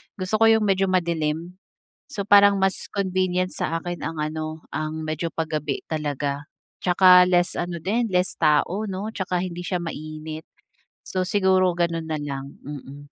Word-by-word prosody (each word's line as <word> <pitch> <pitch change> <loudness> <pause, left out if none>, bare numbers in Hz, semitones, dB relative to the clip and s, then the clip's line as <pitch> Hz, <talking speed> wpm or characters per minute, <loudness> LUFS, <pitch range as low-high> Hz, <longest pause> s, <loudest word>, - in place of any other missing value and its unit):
Gusto 195 +3 -1
ko 225 - +6
yung 220 -1 +5
medyo 195 -1 +2
madilim. 170 0 -1 0.5
So, 200 -6 -4
parang 200 -1 +6
mas 190 0 -1
convenient 185 -2 0
sa 165 +1 -1
akin 175 +1 -6
ang 165 -1 -4
ano, 155 +1 -4
ang 155 0 -3
medyo 155 +2 -2
pagabi 155 -3 -2
talaga 145 -2 -3 0.3
tsaka 180 0 +7
less 180 -1 +2
ano 175 -1 -3
din, 220 +7 -1
less 180 0 +1
tao, 160 +6 +2
'no, 205 +4 -5
tsaka 185 -2 -1
hindi 175 -1 -4
siya 180 0 -2
mainit. 155 -1 -6 0.6
So, 185 -1 -2
siguro 185 -2 +3
ganun 170 -1 -1
na 155 -2 -3
lang, 140 -1 -5
mm. 140 0 -9
175 Hz, 155 wpm, -24 LUFS, 155-185 Hz, 0.6 s, tsaka